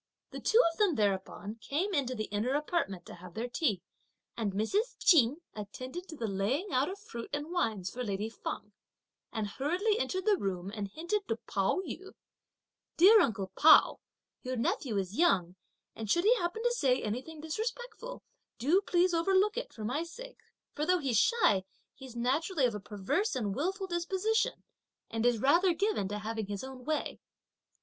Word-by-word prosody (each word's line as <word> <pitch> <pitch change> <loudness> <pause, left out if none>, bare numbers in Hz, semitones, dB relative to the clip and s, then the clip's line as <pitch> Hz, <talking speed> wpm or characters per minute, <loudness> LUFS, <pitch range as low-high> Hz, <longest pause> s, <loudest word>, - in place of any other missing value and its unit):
The - - -6
two 445 - +3
of 330 - -16
them 400 -7 +3
thereupon 205 +1 -1
came 335 - -2
into 265 -5 0
the 215 - -2
inner 230 +6 0
apartment 290 - -1
to - - -10
have 175 0 -12
their 230 +3 -2
tea; 240 - 0 0.5
and 220 -4 -1
Mrs. 390 - 0
Ch'in 295 - +4
attended 255 - -7
to 320 - -8
the 235 - -3
laying 220 - -1
out 260 +5 +2
of 385 - -6
fruit 235 - -8
and 290 +3 -3
wines 215 - -1
for 250 - -4
lady 205 -1 -2
Feng, 210 -2 -6 0.6
and 220 -1 -2
hurriedly 355 - 0
entered 375 -5 -2
the 420 -2 +4
room 190 - -3
and 205 -2 -3
hinted 345 - -3
to 225 - 0
Pao 200 - -1
yü: 385 +2 -8 0.8
"Dear 410 +6 +8
uncle 200 - -1
Pao, 315 - +7 0.4
your 255 -1 -3
nephew 255 - -1
is 195 +6 -3
young, 185 - +3 0.4
and 220 -2 -6
should 345 +10 +3
he 450 +5 +6
happen 355 +5 -2
to 485 - +3
say 265 - +2
anything 255 +9 -4
disrespectful, 465 +9 -5 0.3
do 310 +11 +3
please 360 -2 +2
overlook 385 +5 +3
it, - - -4
for 215 - -7
my 260 +8 -1
sake, - - -9 0.3
for 295 - -3
though 360 +3 +3
shy, 225 - +3 0.3
he's 260 -3 -11
naturally 275 +6 +1
of 240 - +1
a 210 - -4
perverse 210 - -1
and 210 -6 -1
wilful 380 +6 -1
disposition, 380 +7 0 0.5
and 225 +1 +1
is 240 -1 +3
rather 340 - +4
given 400 - 0
to 205 +1 -3
having 220 0 -4
his 200 +1 -4
own 260 -1 -9
way." 310 0 -2
275 Hz, 175 wpm, -31 LUFS, -, 0.8 s, Dear